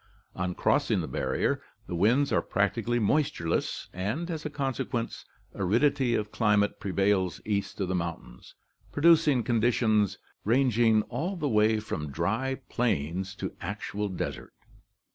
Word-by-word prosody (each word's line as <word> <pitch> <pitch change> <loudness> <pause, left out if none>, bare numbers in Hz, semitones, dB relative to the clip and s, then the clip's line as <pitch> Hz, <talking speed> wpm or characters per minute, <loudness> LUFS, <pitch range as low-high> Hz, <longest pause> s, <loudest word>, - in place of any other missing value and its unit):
On 90 0 -2
crossing - - +2
the - - -4
barrier, - - -1 0.2
the - - -6
winds 115 +11 +3
are - - +3
practically 120 0 0
moistureless 115 - 0
and, 110 - -3
as 160 -2 -4
a 150 - -3
consequence, 135 -4 -3 0.3
aridity 125 +6 +2
of 105 0 -2
climate 105 -2 +2
prevails 95 -2 +1
east 100 -1 -2
of 95 - 0
the 95 - -1
mountains, 85 -8 -5 0.4
producing 155 -4 +4
conditions 110 -3 +2 0.3
rang 125 +4 +3
ing 110 -1 +4
all 135 - -3
the 155 -5 -2
way 110 -2 +3
from 80 -9 -4
dry 110 - -1
plains 95 -4 -1
to - - -5
actual 105 +2 -3
desert. 95 - -5
110 Hz, 135 wpm, -28 LUFS, 95-130 Hz, 0.4 s, producing